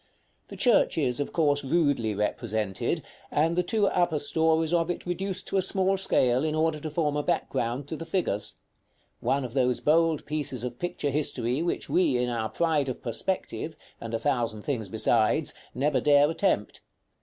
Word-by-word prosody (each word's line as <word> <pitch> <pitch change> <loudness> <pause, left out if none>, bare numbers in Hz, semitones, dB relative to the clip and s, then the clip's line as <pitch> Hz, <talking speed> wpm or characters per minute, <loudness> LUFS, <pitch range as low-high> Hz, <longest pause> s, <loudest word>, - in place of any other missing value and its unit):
The - - -10
church 240 -8 +3
is, 125 -5 0
of 145 - -2
course, 145 -3 +1
rudely 140 -7 +1
represented, 105 -1 -1 0.3
and 165 +3 +1
the 180 - +3
two 205 +4 +1
upper 175 -5 +1
stories 160 +2 +1
of 170 0 +2
it 175 - -3
reduced 185 +1 -3
to - - 0
a - - +4
small 190 +1 +2
scale 130 -8 +2
in 155 -1 0
order 155 -1 +1
to 155 - -5
form 150 -1 0
a 150 - +1
background 125 -1 -1
to - - -3
the 165 - -7
figures; 105 - -1 0.6
one 140 -1 0
of 120 - -7
those 125 -2 +1
bold 160 0 +2
pieces 145 -5 -3
of 125 -1 -5
picture 175 -5 -2
history 130 -2 -1
which 170 - -2
we 165 -8 +2
in 125 0 0
our 110 -2 -2
pride 155 -5 +1
of 125 - -6
perspective, 155 - -3 0.3
and 115 0 -4
a - - +2
thousand 115 -4 -1
things 115 -8 -3
besides, 110 +7 +1 0.2
never 140 +2 +1
dare 145 -1 +5
attempt. 165 - 0
145 Hz, 180 wpm, -27 LUFS, 125-165 Hz, 0.6 s, dare